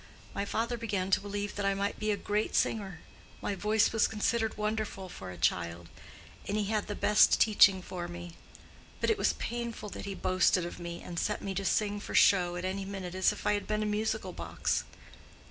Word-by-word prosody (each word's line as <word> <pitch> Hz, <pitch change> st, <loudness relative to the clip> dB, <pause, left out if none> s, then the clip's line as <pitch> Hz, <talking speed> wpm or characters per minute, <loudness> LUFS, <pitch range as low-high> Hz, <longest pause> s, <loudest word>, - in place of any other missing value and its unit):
My 200 Hz, -, -2 dB
father 235 Hz, +3 st, -1 dB
began 195 Hz, -4 st, -2 dB
to -, -, +5 dB
believe 205 Hz, 0 st, -4 dB
that 205 Hz, -, -2 dB
I 195 Hz, 0 st, +2 dB
might 200 Hz, +1 st, -2 dB
be 215 Hz, -, -1 dB
a 205 Hz, -, +1 dB
great 210 Hz, +2 st, -1 dB
singer: 195 Hz, -7 st, 0 dB, 0.4 s
my -, -, -2 dB
voice 210 Hz, +3 st, +2 dB
was 225 Hz, -, +4 dB
considered 220 Hz, +1 st, 0 dB
wonderful 210 Hz, -3 st, -2 dB
for 95 Hz, -, -8 dB
a 90 Hz, -, -8 dB
child; 85 Hz, 0 st, -1 dB, 0.6 s
and 205 Hz, -, -1 dB
he 215 Hz, -, +1 dB
had 210 Hz, +1 st, -1 dB
the 205 Hz, -, -3 dB
best 210 Hz, 0 st, +5 dB
teaching 200 Hz, -3 st, +6 dB
for 175 Hz, -1 st, -5 dB
me. 175 Hz, 0 st, -8 dB, 0.7 s
But -, -, +2 dB
it 440 Hz, -, +1 dB
was -, -, +3 dB
painful 235 Hz, -3 st, -4 dB
that -, -, -7 dB
he 200 Hz, -1 st, -4 dB
boasted 185 Hz, -1 st, +2 dB
of 175 Hz, -, -7 dB
me, 170 Hz, 0 st, -6 dB
and 170 Hz, -1 st, -4 dB
set 210 Hz, -, -1 dB
me 195 Hz, -, -3 dB
to 195 Hz, +1 st, -2 dB
sing 205 Hz, +1 st, +1 dB
for -, -, -6 dB
show 175 Hz, -3 st, +5 dB
at 175 Hz, +1 st, -4 dB
any 195 Hz, +1 st, -2 dB
minute, 190 Hz, -2 st, -6 dB
as 185 Hz, +1 st, +3 dB
if 210 Hz, -, -8 dB
I -, -, +3 dB
had 205 Hz, -, -2 dB
been 215 Hz, 0 st, 0 dB
a -, -, -1 dB
musical 215 Hz, +1 st, -1 dB
box. -, -, -2 dB
200 Hz, 215 wpm, -31 LUFS, 185-215 Hz, 0.7 s, teaching